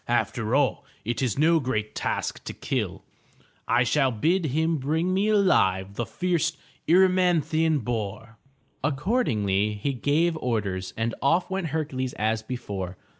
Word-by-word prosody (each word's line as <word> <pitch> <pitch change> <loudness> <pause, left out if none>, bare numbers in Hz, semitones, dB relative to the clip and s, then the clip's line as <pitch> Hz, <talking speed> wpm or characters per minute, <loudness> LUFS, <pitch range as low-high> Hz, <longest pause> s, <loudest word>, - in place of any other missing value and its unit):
After 115 0 0
all 140 -2 +1 0.2
it 120 +3 -2
is 125 -3 0
no 165 +3 +4
great 110 -6 -2
task - - -3
to - - -5
kill. - - -3 0.6
I 120 +1 +3
shall 135 +2 +2
bid 160 - +1
him 160 +4 +1
bring 160 +6 0
me 195 +3 +2
alive 100 - +3
the 120 +2 -3
fierce 165 -3 -1 0.3
Er 180 +3 +7
y - - +5
man'thi 170 -4 +2
an 160 -2 +3
boar.'' 110 0 -4 0.5
Accordingly 120 - +1
he 135 +7 -2
gave 155 +6 +1
orders, 100 -8 -2
and 115 +1 -1
off 170 +7 +2
went 190 -3 -1
Hercules 145 -5 -2
as 110 +1 0
before. 100 -6 -5
135 Hz, 150 wpm, -26 LUFS, 110-165 Hz, 0.6 s, Er